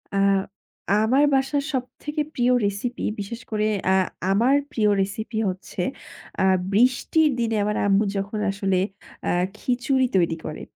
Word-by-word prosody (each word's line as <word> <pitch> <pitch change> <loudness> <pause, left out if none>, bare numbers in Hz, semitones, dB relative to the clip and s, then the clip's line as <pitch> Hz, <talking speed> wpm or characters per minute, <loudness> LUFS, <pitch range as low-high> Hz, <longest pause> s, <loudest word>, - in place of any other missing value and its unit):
আ - - +1 0.9
আমার 265 +6 +3
বাসার 270 +1 +1
সবথেকে 295 +4 -3
প্রিয় 245 0 +3
রেসিপি, 205 +5 -2
বিশেষ 230 +4 -5
করে 215 0 +1 0.3
আ - - +4 0.4
আমার 240 +8 +4 0.2
প্রিয় 215 -6 +2
রেসিপি 220 +3 -3
হচ্ছে, 185 0 -6 0.6
আ - - +4 0.3
বৃষ্টির 255 +7 +3
দিনে 225 -1 0
আমার 210 0 -1
আম্মু 200 +2 +4
যখন 200 +2 -3
আসলে 195 -2 0 0.5
আ - - +2 0.3
খিচুড়ি 255 +2 +1
তৈরি 170 -2 +2
করে। 155 - -6
225 Hz, 135 wpm, -24 LUFS, 200-255 Hz, 0.9 s, আ